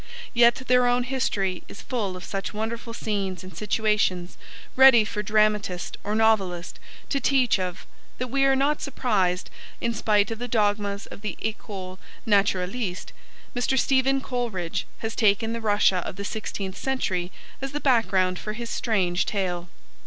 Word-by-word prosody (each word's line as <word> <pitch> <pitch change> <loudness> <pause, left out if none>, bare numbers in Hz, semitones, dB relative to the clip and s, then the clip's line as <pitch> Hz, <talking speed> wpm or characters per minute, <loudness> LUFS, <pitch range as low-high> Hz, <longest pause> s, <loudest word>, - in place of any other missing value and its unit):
Yet 235 -1 +6
their 250 0 +4
own 245 0 +2
history 205 -8 -1
is - - -11
full 205 -8 -2
of 180 - -10
such 195 +2 -4
wonderful 230 +2 -4
scenes 200 -5 -3
and 185 -2 -11
situations, 210 -3 0 0.4
ready 260 -4 +8
for 210 0 -3
dramatist 210 -4 +1
or 210 - -1
novelist 195 -6 +1 0.3
to 275 - +1
treat 255 -5 +3
of, 180 -1 -4 0.3
that 250 -1 -4
we 275 0 +2
are 270 0 +4
not 285 +3 +1
surprised 200 -10 0 0.3
that, - - -4
in 235 - +1
spite 210 -1 +2
of 225 - -4
the 245 - -3
dogmas 205 -2 0
of - - -11
the 210 -3 -4
ecole 195 -4 -5 0.3
naturaliste, 195 -1 0 0.4
Mr. 245 +2 +1
Stephen 270 +1 +3
Coleridge 230 -11 -3 0.2
has 225 - -3
taken 225 +1 +2
the 230 - -4
Russia 205 -3 +3
of 180 - -4
the 200 +1 -5
sixteenth 200 -3 -4
century 190 -10 -1 0.3
as 270 0 -3
the 295 - -3
background 190 -9 +2
for 215 - -4
his 235 +1 -6
strange 185 -6 0
tale. 180 -4 -2
215 Hz, 160 wpm, -25 LUFS, 190-240 Hz, 0.4 s, ready